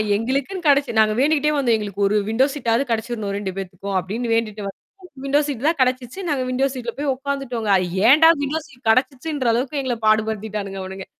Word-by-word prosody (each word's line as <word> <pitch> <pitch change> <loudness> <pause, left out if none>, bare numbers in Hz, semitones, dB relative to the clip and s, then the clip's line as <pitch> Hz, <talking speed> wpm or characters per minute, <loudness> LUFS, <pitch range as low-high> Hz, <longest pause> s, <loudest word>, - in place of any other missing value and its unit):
எங்களுக்குன்னு 275 - -2
கெடைச்சு 280 -3 +3
நாங்க 215 -1 +4
வேண்டிக்கிட்டே 300 +1 +2
வந்தோம். 240 -5 +2
எங்களுக்கு 205 -2 -6
ஒரு 210 - 0
விண்டோ 250 +4 +3
சீட்டாவது 240 -2 0
கெடைச்சிரணும் 220 -3 -2
2 195 -2 -3
பேத்துக்கும் 195 +1 -4
அப்டின்னு 230 +6 -3
வேண்டிட்டு 215 -2 -2
வந்தா 195 - -8 0.5
விண்டோ 285 +2 +3
சீட் 275 -1 -4
தான் 325 - +2
கெடைச்சிச்சு. 255 +5 -1
நாங்க 270 -3 0
விண்டோ 265 +2 +1
சீட்ல 240 -2 -5
போய் 285 -2 0
உக்காந்துட்டோங்க. 265 -5 -3
அது 185 - 0 0.2
ஏன்டா 320 +4 +7
விண்டோ 295 +3 -1
சீட் 250 -4 -12
கிடைச்சிச்சுன்ற 260 +1 +1
அளவுக்கு 265 +4 -1
எங்கள 245 -3 -2
பாடுபடுத்திட்டானுங்க 215 -2 0
அவனுங்க. 190 0 -7
245 Hz, 175 wpm, -21 LUFS, 215-275 Hz, 0.5 s, ஏன்டா